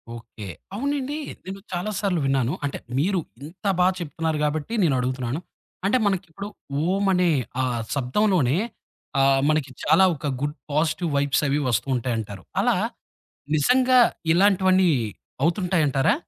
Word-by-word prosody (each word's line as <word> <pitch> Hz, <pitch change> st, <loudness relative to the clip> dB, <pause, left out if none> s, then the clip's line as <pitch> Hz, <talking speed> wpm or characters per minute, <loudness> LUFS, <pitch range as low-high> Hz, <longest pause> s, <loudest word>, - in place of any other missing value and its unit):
Okay. 115 Hz, -3 st, -10 dB, 0.3 s
అవునండి. 280 Hz, +4 st, -2 dB, 0.3 s
నేను 190 Hz, +1 st, -6 dB
చాలా 180 Hz, +4 st, -2 dB
సార్లు 190 Hz, -5 st, 0 dB
విన్నాను. 135 Hz, -1 st, +1 dB
అంటే 140 Hz, -, -3 dB, 0.2 s
మీరు 185 Hz, +5 st, +1 dB, 0.2 s
ఇంత 170 Hz, +7 st, -12 dB
బా 180 Hz, -, +5 dB
చెప్తున్నారు 160 Hz, -1 st, -2 dB
కాబట్టి 150 Hz, +7 st, -2 dB
నేనడుగుతున్నాను. 130 Hz, -2 st, 0 dB, 0.5 s
అంటే 205 Hz, +6 st, +3 dB
మనకిప్పుడు, 195 Hz, 0 st, -2 dB, 0.4 s
ఓం 195 Hz, +1 st, +1 dB
అనే 180 Hz, -1 st, +3 dB, 0.3 s
ఆ -, -, +1 dB, 0.3 s
శబ్దంలోనే 145 Hz, -, +2 dB, 0.6 s
ఆహ్, 135 Hz, 0 st, +4 dB
మనకి 155 Hz, -3 st, +1 dB
చాలా 160 Hz, +5 st, +5 dB
ఒక 150 Hz, -, -8 dB, 0.2 s
గుడ్ 145 Hz, +1 st, -1 dB, 0.2 s
పాజిటివ్ 155 Hz, +3 st, 0 dB
వైబ్స్ 140 Hz, -1 st, +2 dB
అవి 140 Hz, +1 st, +1 dB
వస్తూంటాయంటారు. 115 Hz, -5 st, -2 dB, 0.2 s
అలా -, -, +3 dB, 0.8 s
నిజంగా 255 Hz, -, +4 dB, 0.4 s
ఇలాంటివన్నీ 190 Hz, 0 st, +4 dB, 0.5 s
అవుతుంటాయంటారా? 165 Hz, -6 st, +2 dB
160 Hz, 120 wpm, -24 LUFS, 135-190 Hz, 0.8 s, బా